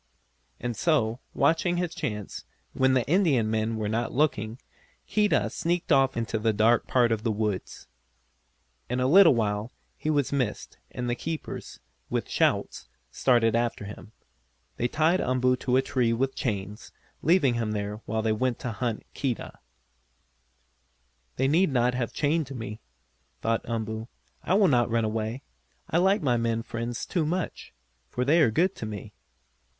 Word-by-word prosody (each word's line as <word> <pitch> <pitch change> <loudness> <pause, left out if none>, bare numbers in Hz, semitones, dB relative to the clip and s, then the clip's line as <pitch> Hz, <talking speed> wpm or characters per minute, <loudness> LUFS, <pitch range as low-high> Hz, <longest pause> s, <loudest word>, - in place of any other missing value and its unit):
And 120 -1 -3
so, 130 -8 +1 0.2
watching 165 +5 +2
his 175 -1 -1
chance, 105 -4 -5 0.3
when 130 0 +3
the 125 - +2
Indian 145 - +2
men 110 +1 0
were 110 -1 -2
not 115 +2 -1
looking, 120 -5 0 0.5
Keedah 210 -1 +2
sneaked 175 0 -1
off 135 -2 +4
into 115 -1 -1
the 110 0 +1
dark 110 +3 +3
part 120 -2 +3
of 110 -1 0
the 115 - 0
woods. 105 -3 -3 1.0
In 125 +1 -1
a 125 - +1
little 165 +1 +7
while 105 0 -1 0.2
he 155 - -4
was 145 -3 +1
missed, 125 -6 -2
and 125 0 -4
the 120 - +1
keepers, 155 - -6 0.3
with - - -2
shouts, - - 0 0.2
started 115 -3 +3
after 115 -3 -1
him. 105 +1 -10 0.7
They 120 - +1
tied 160 +7 +2
Umboo 125 0 +2
to 125 0 +1
a 130 - +3
tree 125 -3 +1
with 135 +3 0
chains, 105 -2 -4 0.3
leaving 155 -6 +4
him 115 -2 -1
there 105 +1 -4
while 110 0 -1
they 110 -1 +2
went 125 +2 0
to 125 - -3
hunt 115 0 -3
Keedah. 130 -4 -3 1.8
"They 135 - +1
need 165 +4 +3
not 125 -1 +2
have 125 -2 -2
chained 150 -1 0
me," 110 -2 -6 0.6
thought 115 0 +1
Umboo. 110 -1 -3 0.3
"I 185 - +1
would 195 -5 +5
not 120 -2 +3
run 115 -1 +1
away. 110 +4 -3 0.5
I 165 - +3
like 190 +1 +3
my 125 -4 +2
men 115 -1 0
friends 115 0 -4
too 175 -4 0
much, 175 +3 -3 0.4
for 125 - -2
they 160 +5 +4
are 140 - +5
good 175 - +2
to 110 - -5
me." 105 -3 -7
120 Hz, 160 wpm, -27 LUFS, 110-145 Hz, 1.8 s, little